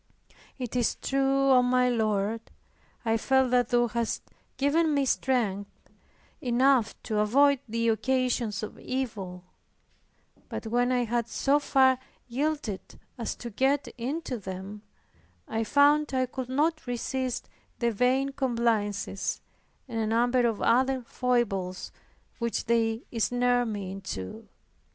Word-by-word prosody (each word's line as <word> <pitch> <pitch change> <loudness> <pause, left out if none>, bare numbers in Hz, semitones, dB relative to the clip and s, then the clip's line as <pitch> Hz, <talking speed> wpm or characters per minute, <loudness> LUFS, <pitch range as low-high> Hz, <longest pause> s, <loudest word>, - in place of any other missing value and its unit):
"Tis 245 -2 +1
true, 275 0 +2
O 255 -1 +7
my 250 0 +3
Lord, 220 -2 0 0.6
I 225 0 +2
felt 265 +1 +2
that 245 -2 +3
Thou 240 -1 +3
hadst 235 0 -2 0.3
given 300 +2 +2
me 280 -1 +2
strength 220 -7 0 0.7
enough 250 -1 +3
to 215 -1 -1
avoid 275 +6 +4
the 230 +1 0
occasions 245 -2 0
of 215 - -7
evil 205 -9 -4 1.1
but - - -5
when 245 +3 +1
I 250 -1 +2
had 235 0 -1
so 280 +5 +2
far 260 -2 +4 0.3
yielded 265 -5 -2 0.4
as 230 - -3
to 235 - -8
get 270 +6 +1
into 260 +1 -3
them, 190 +2 -7 0.7
I 225 0 -1
found 290 +3 +4
I 255 0 +2
could 255 0 -6
not 310 +3 0
resist 250 +1 -2 0.3
the 235 -2 +1
vain 255 +5 +2
complaisances, 230 -7 -1 0.5
and 230 -3 -3
a 220 - 0
number 240 +2 +3
of 225 -3 -2
other 260 +1 +3
foibles 225 -8 -1 0.5
which 235 -1 -2
they 225 -1 +1
ensnared 245 +1 +1
me 200 -4 -4
into." 105 - -7
245 Hz, 125 wpm, -28 LUFS, 220-265 Hz, 1.1 s, O